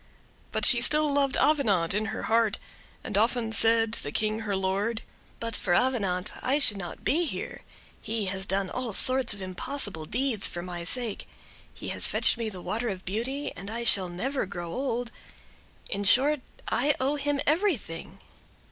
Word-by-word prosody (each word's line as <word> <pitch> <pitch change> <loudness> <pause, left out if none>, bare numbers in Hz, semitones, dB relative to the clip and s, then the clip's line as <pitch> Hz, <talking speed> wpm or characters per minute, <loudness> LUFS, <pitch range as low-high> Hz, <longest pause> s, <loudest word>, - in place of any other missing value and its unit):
But - - 0
she 240 -2 +7
still 300 +3 +4
loved 280 -1 +1
Avenant 210 - +2
in 210 +2 -1
her 220 - -5
heart, 225 -2 +1 0.5
and - - -4
often 225 +2 +1
said 225 0 +3
to - - -6
the 145 - -6
King 215 +5 -1
her 210 -3 -3
lord: 195 +4 -2 0.4
"But 230 -2 -2
for 175 -3 0
Avenant 205 -7 0
I 270 +3 +1
should 225 -8 +7
not 175 -3 -7
be 340 +4 +1
here; - - -6 0.4
he 220 -1 -3
has 190 +1 -3
done 190 -1 -1
all 250 -4 -2
sorts 255 0 +2
of 195 - -8
impossible 185 - -2
deeds 245 - 0
for 175 -1 -6
my 175 -1 -6
sake; 235 +1 -3 0.4
he - - -8
has - - +1
fetched - - +4
me 225 -1 -2
the 185 -4 -9
water 230 +2 -2
of 190 -2 -6
beauty, 245 +9 -3
and 195 +4 -8
I 230 +2 -4
shall 190 -5 +5
never 250 +7 -3
grow 175 -2 -7
old—in 240 -5 -6
short, 275 +7 +5 0.3
I 285 +4 +1
owe 275 +3 0
him 290 0 -1
everything." 305 - -1
225 Hz, 175 wpm, -27 LUFS, 195-260 Hz, 0.5 s, she